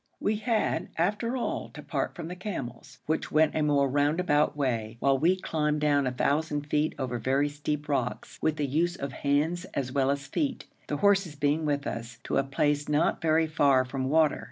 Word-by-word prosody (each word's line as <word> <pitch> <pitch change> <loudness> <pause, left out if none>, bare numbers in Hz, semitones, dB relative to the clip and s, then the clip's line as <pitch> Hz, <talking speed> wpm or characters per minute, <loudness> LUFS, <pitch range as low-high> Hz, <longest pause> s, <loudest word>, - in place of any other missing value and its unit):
We 210 +1 0
had, 220 0 0
after, 210 +9 0
all, 245 - -3
to - - -8
part - - -2
from 165 -2 -6
the 180 - -6
camels, 170 - -6
which 160 +1 -1
went 155 0 +4
a 155 - 0
more 145 -2 +3
roundabout 145 +2 +2
way, 115 -5 -1
while 135 0 +2
we 170 +6 +4
climbed 150 -4 -1
down 145 -2 +3
1,000 145 +4 0
feet 150 +1 0
over 125 -3 -3
very 135 +5 +1
steep 150 0 -4
rocks, 130 -4 -2
with 155 - +1
the 150 - -1
use 165 +6 0
of 140 -6 -5
hands 150 +6 0
as 130 -2 -2
well 135 -1 +1
as 140 0 -1
feet, 275 - -2 0.2
the 145 - -2
horses 195 -3 +2
being 145 +2 +1
with 145 -1 0
us, 115 -2 -5
to - - -1
a 135 - +3
place 145 +2 0
not 150 +2 +1
very 160 0 +3
far 140 -4 +3
from 130 +1 -3
water. 155 +2 +3
145 Hz, 195 wpm, -28 LUFS, 140-160 Hz, 0.2 s, went